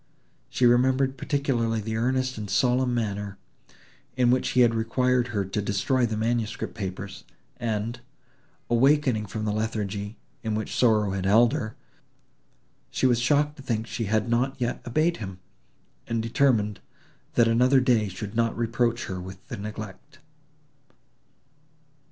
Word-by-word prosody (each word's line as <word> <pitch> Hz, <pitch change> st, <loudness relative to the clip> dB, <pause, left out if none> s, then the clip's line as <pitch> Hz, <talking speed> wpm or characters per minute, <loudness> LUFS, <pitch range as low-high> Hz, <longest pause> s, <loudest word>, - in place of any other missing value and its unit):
She 125 Hz, -, +1 dB
remembered 130 Hz, +2 st, +3 dB
particularly 125 Hz, -5 st, 0 dB
the 110 Hz, +1 st, -3 dB
earnest 130 Hz, +2 st, 0 dB
and 105 Hz, -2 st, -6 dB
solemn 125 Hz, +5 st, +2 dB
manner, 100 Hz, -3 st, -3 dB, 0.8 s
in 125 Hz, -1 st, +4 dB
which 130 Hz, -, +1 dB
he 125 Hz, -, +4 dB
had 120 Hz, -1 st, +5 dB
required 125 Hz, +2 st, +1 dB
her 105 Hz, -5 st, -1 dB
to 95 Hz, +3 st, -2 dB
destroy 110 Hz, +5 st, +1 dB
the 110 Hz, -1 st, -3 dB
manuscript 115 Hz, 0 st, -1 dB
papers, 95 Hz, -3 st, -6 dB, 0.3 s
and, 115 Hz, +1 st, -2 dB, 0.7 s
awakening 125 Hz, -2 st, +3 dB
from 110 Hz, +1 st, -4 dB
the 105 Hz, -, 0 dB
lethargy, 105 Hz, -1 st, -3 dB, 0.2 s
in 110 Hz, -1 st, -2 dB
which 110 Hz, -1 st, -3 dB
sorrow 110 Hz, -5 st, +3 dB
had 95 Hz, 0 st, -2 dB
held 115 Hz, +5 st, +5 dB
her, 115 Hz, -8 st, -3 dB, 1.1 s
she -, -, -1 dB
was 120 Hz, -2 st, +4 dB
shocked 145 Hz, +4 st, +2 dB
to -, -, -10 dB
think 115 Hz, -4 st, -2 dB
she 115 Hz, 0 st, -3 dB
had 110 Hz, +2 st, +1 dB
not 130 Hz, +3 st, 0 dB
yet 120 Hz, -1 st, -2 dB
obeyed 155 Hz, +8 st, +1 dB
him, 95 Hz, -4 st, -7 dB, 0.7 s
and 115 Hz, -1 st, -1 dB
determined, 115 Hz, -4 st, +2 dB, 0.6 s
that 120 Hz, -1 st, +5 dB
another 125 Hz, +4 st, +4 dB
day 120 Hz, -5 st, +2 dB
should 100 Hz, +2 st, -6 dB
not 115 Hz, -1 st, +1 dB
reproach 115 Hz, 0 st, 0 dB
her 90 Hz, -1 st, -5 dB
with 95 Hz, +1 st, -10 dB
the 125 Hz, -, -4 dB
neglect. 105 Hz, +6 st, -8 dB
115 Hz, 145 wpm, -26 LUFS, 105-125 Hz, 1.1 s, had